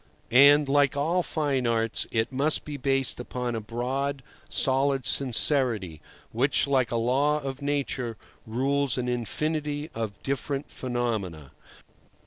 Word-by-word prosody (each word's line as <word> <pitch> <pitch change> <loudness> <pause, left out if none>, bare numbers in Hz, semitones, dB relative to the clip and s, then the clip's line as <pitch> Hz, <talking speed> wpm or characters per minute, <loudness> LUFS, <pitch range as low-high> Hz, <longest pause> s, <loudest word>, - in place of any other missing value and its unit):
And, 140 +4 +7
like 140 0 +2
all 165 +6 +1
fine 145 -7 -1
arts, 115 -1 0
it 110 +1 -1
must 140 +4 +1
be 150 - -6
based 135 -1 -1
upon 125 0 -4
a 115 - -3
broad, 130 +5 -3 0.3
solid 135 0 +1
sincerity, 120 - +2 0.3
which, 130 +5 +2
like 130 -4 +1
a 120 - -3
law 135 +6 +2
of 135 -1 -6
Nature, 140 -5 -2 0.3
rules 135 +4 0
an 125 -1 -2
infinity 150 +5 -2
of 110 -3 -5
different 140 +1 -3
phenomena. 110 - -3
135 Hz, 125 wpm, -26 LUFS, 120-140 Hz, 0.3 s, And